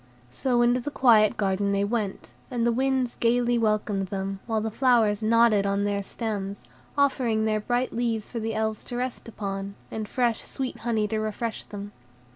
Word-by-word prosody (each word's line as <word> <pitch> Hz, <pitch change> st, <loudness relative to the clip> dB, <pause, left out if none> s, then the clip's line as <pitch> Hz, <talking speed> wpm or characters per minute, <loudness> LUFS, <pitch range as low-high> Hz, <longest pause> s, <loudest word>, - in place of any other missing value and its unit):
So 240 Hz, -, +1 dB
into 240 Hz, +1 st, +3 dB
the 250 Hz, -, -4 dB
quiet 225 Hz, -7 st, +4 dB
garden 200 Hz, 0 st, +1 dB
they 200 Hz, 0 st, +2 dB
went, 205 Hz, -2 st, -2 dB, 0.2 s
and 240 Hz, -3 st, 0 dB
the 235 Hz, -, +3 dB
winds 260 Hz, 0 st, 0 dB
gayly 240 Hz, 0 st, +2 dB
welcomed 210 Hz, -3 st, 0 dB
them, 195 Hz, 0 st, -3 dB
while 225 Hz, -2 st, +1 dB
the 220 Hz, +1 st, -2 dB
flowers 230 Hz, -4 st, +3 dB
nodded 220 Hz, -2 st, +4 dB
on 200 Hz, 0 st, +1 dB
their 205 Hz, 0 st, 0 dB
stems, 200 Hz, -2 st, -4 dB, 0.3 s
offering 245 Hz, -6 st, +2 dB
their 215 Hz, -1 st, +1 dB
bright 245 Hz, +4 st, -1 dB
leaves 230 Hz, -2 st, -1 dB
for 235 Hz, -, -5 dB
the 225 Hz, 0 st, -2 dB
Elves 220 Hz, -1 st, -1 dB
to 245 Hz, -, -6 dB
rest 250 Hz, -1 st, -4 dB
upon, 200 Hz, -2 st, -5 dB, 0.2 s
and 220 Hz, -1 st, -4 dB
fresh, 240 Hz, -3 st, +1 dB
sweet 265 Hz, -2 st, -5 dB
honey 220 Hz, -3 st, 0 dB
to 220 Hz, -, -1 dB
refresh 215 Hz, +1 st, -3 dB
them. 205 Hz, 0 st, -7 dB
220 Hz, 180 wpm, -26 LUFS, 205-240 Hz, 0.3 s, quiet